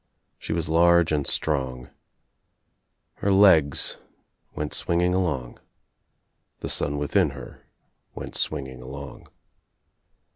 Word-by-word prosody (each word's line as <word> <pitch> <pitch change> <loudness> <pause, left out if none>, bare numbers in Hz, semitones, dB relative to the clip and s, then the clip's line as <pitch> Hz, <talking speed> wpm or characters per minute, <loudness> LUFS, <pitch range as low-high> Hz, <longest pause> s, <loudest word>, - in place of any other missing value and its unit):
She - - -7
was 80 -1 -1
large 85 +1 +4
and 75 -3 0
strong. 65 -5 -1 1.3
Her 100 - 0
legs 95 -8 +4 0.6
went 75 0 -4
swinging 90 +1 +1
along. 75 -10 -2 1.0
The - - -4
son 70 +1 0
within 70 -1 +1
her - - -12 0.5
went - - -8
swing 75 -3 0
ing 65 -1 -10
along. 65 +1 -10
75 Hz, 105 wpm, -24 LUFS, 65-85 Hz, 1.3 s, large